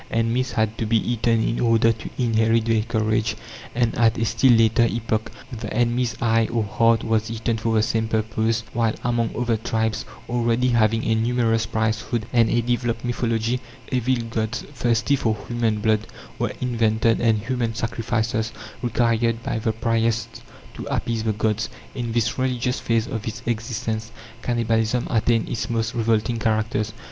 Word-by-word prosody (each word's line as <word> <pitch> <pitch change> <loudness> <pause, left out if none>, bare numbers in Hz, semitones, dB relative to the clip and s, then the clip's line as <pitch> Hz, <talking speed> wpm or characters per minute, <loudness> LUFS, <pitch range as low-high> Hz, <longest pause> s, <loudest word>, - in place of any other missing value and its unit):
Enemies 115 +2 0
had 110 -1 0
to 115 - -1
be 115 +1 +3
eaten 115 0 +1
in 115 - -1
order 115 -1 +4
to 110 - -6
inherit 115 -2 +2
their 115 -1 +2
courage; 110 -1 0 0.4
and, 120 -2 +2
at 115 0 +3
a 115 - +1
still 115 +3 +4
later 115 0 +4
epoch, 110 -1 -2 0.2
the 115 -3 -6
enemy's 120 +1 0
eye 115 -1 +2
or 115 -2 +1
heart 115 +2 +2
was 110 0 0
eaten 115 0 -1
for 110 0 -1
the 110 - +3
same 110 0 0
purpose; 110 +1 0
while 115 -2 +1
among 120 -2 +1
other 120 -1 +1
tribes, 110 0 -1 0.2
already 120 +1 +1
having 115 -1 +2
a 115 - +2
numerous 115 -1 +1
priesthood 110 +1 -1
and 115 -2 +4
a 120 0 +2
developed 120 -1 -1
mythology, 120 0 0 0.3
evil 130 0 +2 0.2
gods, 110 +1 -2
thirsty 120 +1 +1
for 110 -5 0
human 115 -3 0
blood, 110 0 +1 0.3
were - - -1
invented, 115 -2 +2
and 115 -2 +3
human 115 0 -2
sacrifices 115 -1 -1 0.3
required 115 -1 +1
by 110 - -2
the 110 0 0
priests 115 0 -1 0.3
to - - -7
appease 115 -1 -1
the 110 - +1
gods. 110 +1 -1 0.2
In 120 -3 -3
this 115 +1 0
religious 125 -1 0
phase 115 -1 +1
of 115 -4 -5
its 115 +2 -5
existence, 115 -1 -3 0.3
cannibalism 115 0 0
attained 115 0 +2
its 115 - -3
most 115 0 -1
revolting 115 0 +1
characters. 110 -1 0
115 Hz, 160 wpm, -23 LUFS, 110-120 Hz, 0.4 s, order